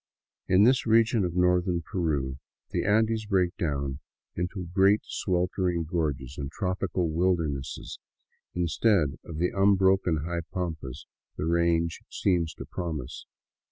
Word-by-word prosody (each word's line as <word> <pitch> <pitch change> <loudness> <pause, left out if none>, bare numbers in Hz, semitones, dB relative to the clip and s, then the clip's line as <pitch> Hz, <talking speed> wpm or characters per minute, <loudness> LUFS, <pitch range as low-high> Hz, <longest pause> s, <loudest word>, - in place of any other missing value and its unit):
In 95 +2 +5
this 125 +1 +4
region 115 -1 +4
of 90 -1 -2
northern 90 -1 +2
Peru, 70 -8 -2 0.3
the - - -1
Andes 110 +1 +2
break 95 -2 +1
down 70 -6 -2 0.3
into 90 +1 -3
great 100 +2 +4
sweltering 90 -1 -1
gorges 75 -5 -3
and 70 -1 -4
tropical 90 -1 -1
wildernesses 80 -5 -1 0.6
instead 85 -2 +1
of 80 - -8
the 90 +2 +1
unbroken 95 -5 +3
high 85 0 -2
pampas 80 -8 -4 0.3
the - - -2
range 85 0 +1
seems 85 -4 0
to - - -8
promise. 80 -8 -5
90 Hz, 125 wpm, -27 LUFS, 80-95 Hz, 0.6 s, In